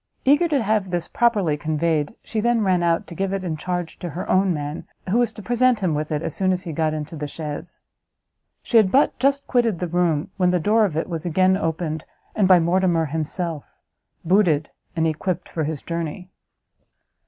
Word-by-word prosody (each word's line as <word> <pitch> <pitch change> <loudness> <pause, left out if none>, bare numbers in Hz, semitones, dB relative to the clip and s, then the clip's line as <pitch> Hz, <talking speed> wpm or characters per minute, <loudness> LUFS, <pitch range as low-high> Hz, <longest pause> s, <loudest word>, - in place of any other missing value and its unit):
Eager 290 +6 +5
to 285 -6 +1
have 210 -2 0
this 175 -2 -2
properly 205 -10 +2
conveyed, 155 +2 -1
she 220 - -3
then 235 +1 +2
ran 185 -3 +2
out, 170 -1 +1
to - - -10
give 195 +2 -2
it 195 -1 -2
in 170 -4 -2
charge 175 +1 -4
to 175 - -5
her 170 +4 -5
own 190 0 +3
man, 150 -1 -4 0.3
who 230 - +3
was 240 -2 +2
to 215 - -11
present 245 -1 +2
him 180 -4 +1
with 150 +1 -3
it 150 +1 -1
as - - -4 0.2
he 165 - -5
got 155 0 0
into 155 +1 -5
the 150 -1 -4
chaise. 150 +2 -7 0.8
She 235 - +2
had 205 -4 +5
but 275 -2 +3
just 275 +2 +2
quitted 235 -6 +1
the 180 - -2
room, 175 0 0
when 180 -2 +3
the 180 0 +2
door 215 +6 +3
of 165 -6 -3
it 160 - -1
was 165 -3 -4
again 185 +2 +3
opened, 160 -3 -2 0.3
and 205 -3 +3
by 185 -1 +7
Mortimer 170 -1 +2
himself, 160 +1 -4 0.5
booted, 165 -5 +2 0.2
and 165 -1 +1
equipped 170 +2 -2
for 160 -2 -3
his 155 -2 -4
journey. 170 +2 -5
175 Hz, 200 wpm, -22 LUFS, 160-200 Hz, 0.8 s, by